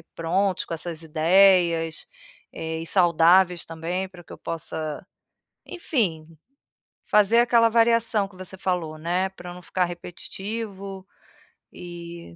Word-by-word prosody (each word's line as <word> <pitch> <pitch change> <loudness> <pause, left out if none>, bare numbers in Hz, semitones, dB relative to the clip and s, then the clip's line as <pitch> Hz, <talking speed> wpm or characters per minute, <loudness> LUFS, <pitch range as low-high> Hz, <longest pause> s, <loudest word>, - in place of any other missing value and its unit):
prontos 185 +4 0
com - - -6
essas 165 0 -6
ideias, 165 0 +3 0.4
eh, 160 0 -5
e - - -6
saudáveis 175 0 +4
também 170 +4 -4
para 180 -2 -14
que - - -12
eu - - -12
possa, 160 0 -5 0.6
enfim, 195 - -2 0.8
fazer 210 +2 +4
aquela 235 -1 +4
variação 230 -2 +3
que 195 - -19
você 185 +1 -8
falou, 175 -4 -2
né, 175 +4 -1
para 180 -2 -10
eu - - -8
não 180 - -11
ficar 180 +1 0
repetitivo, 195 +2 -7 0.7
eh, 170 - -10
180 Hz, 125 wpm, -24 LUFS, 165-195 Hz, 0.8 s, saudáveis